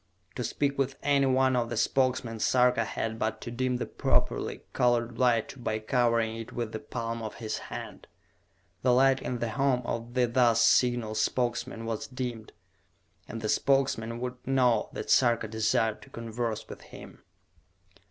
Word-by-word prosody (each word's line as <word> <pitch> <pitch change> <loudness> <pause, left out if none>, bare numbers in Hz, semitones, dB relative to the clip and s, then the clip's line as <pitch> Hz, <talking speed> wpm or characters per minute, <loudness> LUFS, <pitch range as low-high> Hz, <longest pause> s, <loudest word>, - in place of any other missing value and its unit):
To 125 - -4
speak 140 +2 -1
with 135 0 0
any 140 -1 +3
one 130 0 +3
of 120 -1 0
the 120 - -3
Spokesmen 125 -3 +1
Sarka 125 0 +3
had 110 +1 -3
but 110 0 -1
to 120 - -6
dim 125 +1 -1
the - - -3
properly - - 0
colored 120 -1 +1
light 120 0 +1
by 110 - 0
covering 115 -1 +1
it 115 -1 -7
with 115 -2 -4
the 110 - -4
palm 115 -1 -4
of 110 -1 -6
his 110 -2 -4
hand. - - -8 0.7
The 125 -1 +3
light 135 +1 +4
in 125 - -3
the 120 -1 -2
home 130 +1 +1
of 115 +1 -4
the 125 -1 +4
thus 120 -1 +3
signalled 120 -3 +2
Spokesman 115 0 -1
was 115 -1 -3
dimmed, 125 -4 -5 0.8
and 115 0 -6
the 110 - -2
Spokesman 120 -3 +1
would 125 0 -4
know 125 -5 +2
that - - -4
Sarka 120 -3 +4
desired 110 0 0
to - - -14
converse 115 -1 -4
with - - -10
him. - - -13
120 Hz, 165 wpm, -28 LUFS, 115-125 Hz, 0.8 s, light